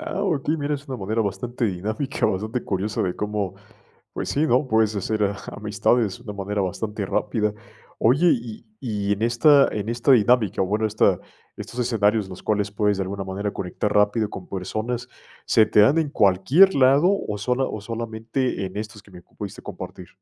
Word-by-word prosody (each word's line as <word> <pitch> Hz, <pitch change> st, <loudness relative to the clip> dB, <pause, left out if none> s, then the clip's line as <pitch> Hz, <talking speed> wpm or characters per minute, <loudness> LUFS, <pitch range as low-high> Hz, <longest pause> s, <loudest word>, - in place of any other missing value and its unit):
Ah, 315 Hz, -9 st, -4 dB
okey, 160 Hz, -4 st, 0 dB
mira, 145 Hz, 0 st, -1 dB
es 140 Hz, +1 st, -8 dB
una 130 Hz, -, -4 dB
manera 110 Hz, +2 st, -1 dB
bastante 120 Hz, +4 st, -3 dB
dinámica, 110 Hz, +8 st, -1 dB
bastante 110 Hz, +5 st, -2 dB
curiosa 100 Hz, +2 st, -1 dB
de 90 Hz, -1 st, -1 dB
cómo 105 Hz, -2 st, -3 dB, 0.6 s
pues -, -, -4 dB
sí, 145 Hz, -, +1 dB
¿no?, 130 Hz, +1 st, +2 dB
puedes 110 Hz, -3 st, +2 dB
hacer 105 Hz, +2 st, -1 dB
a 100 Hz, 0 st, -1 dB, 0.2 s
amistades 105 Hz, 0 st, 0 dB
de 120 Hz, -, -18 dB
una 105 Hz, -, -6 dB
manera 105 Hz, +1 st, -2 dB
bastante 105 Hz, +2 st, -3 dB
rápida. 105 Hz, 0 st, 0 dB, 0.5 s
Oye, 135 Hz, +10 st, +3 dB
y 115 Hz, -2 st, -5 dB, 0.2 s
y 105 Hz, -5 st, -1 dB
en 100 Hz, -, -2 dB
esta 135 Hz, +5 st, +5 dB
en 105 Hz, 0 st, -4 dB
esta 120 Hz, +3 st, 0 dB
dinámica, 115 Hz, -4 st, +3 dB
bueno, 105 Hz, +4 st, 0 dB
esta 110 Hz, 0 st, +2 dB, 0.4 s
estos 125 Hz, -, -8 dB
escenarios 110 Hz, -4 st, +1 dB
los 95 Hz, -, -9 dB
cuales 105 Hz, -1 st, 0 dB
puedes, 105 Hz, 0 st, +1 dB
de 95 Hz, -, -1 dB
alguna 95 Hz, +1 st, -4 dB
manera, 100 Hz, +2 st, -3 dB
conectar 100 Hz, +3 st, -3 dB
rápido 105 Hz, +1 st, +3 dB
con 90 Hz, -, -9 dB
personas, 110 Hz, +6 st, -3 dB, 0.4 s
¿se 110 Hz, -, +4 dB
te 105 Hz, -, +4 dB
dan 135 Hz, +10 st, +5 dB
en 160 Hz, -, +1 dB
cualquier 125 Hz, -, +4 dB
lado 140 Hz, +5 st, +5 dB, 0.2 s
o 105 Hz, -, -2 dB
sola 125 Hz, +5 st, 0 dB
o 110 Hz, -, -4 dB
solamente 115 Hz, +1 st, -3 dB
en 95 Hz, +1 st, -7 dB
estos 105 Hz, -1 st, -7 dB
que 105 Hz, -, -20 dB
me 90 Hz, -2 st, -12 dB
pudiste -, -, -9 dB
compartir? -, -, -8 dB
110 Hz, 185 wpm, -23 LUFS, 100-125 Hz, 0.6 s, esta